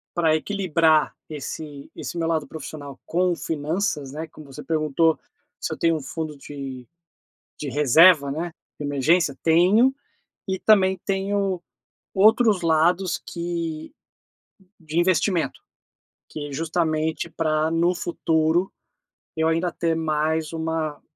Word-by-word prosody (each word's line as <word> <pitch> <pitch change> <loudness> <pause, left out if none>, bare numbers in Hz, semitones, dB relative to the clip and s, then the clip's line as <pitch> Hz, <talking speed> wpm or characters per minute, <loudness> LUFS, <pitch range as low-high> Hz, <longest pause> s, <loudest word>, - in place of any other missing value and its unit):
pra 160 -2 +3
equilibrar 160 -5 +2
esse 150 -1 -7
esse 175 - -6
meu 165 - 0
lado 160 -2 0
profissional 145 -3 -8
com 180 +1 +1
finanças, 155 -1 -2
né, 155 +2 -5
como 155 -1 -14
você 150 - -8
perguntou 160 0 +1 0.4
se - - -3
eu - - -5
tenho 165 -1 +2
um 150 - -6
fundo 155 +1 -5
de 135 -3 -8 0.7
de 145 - -4
reserva, 145 +2 +5
né, 165 +4 -3 0.3
de 145 - -4
emergência, 145 +1 +2
tenho 190 +11 +5 0.5
e 190 -1 -2
também 190 -3 +4
tenho 195 -2 -1 0.5
outros 215 -1 +4
lados 170 +3 +2
que 170 - -4 0.9
de 160 0 -2
investimento, 175 0 +1 0.7
que 145 -1 -6
justamente 160 +1 -1
pra 155 -1 0
no 170 +2 +2
futuro, 165 +1 0 0.6
eu 160 0 +1
ainda 165 +2 +1
ter 165 -1 -1
mais 155 0 -1
uma 160 -2 -3
160 Hz, 120 wpm, -24 LUFS, 155-175 Hz, 0.9 s, reserva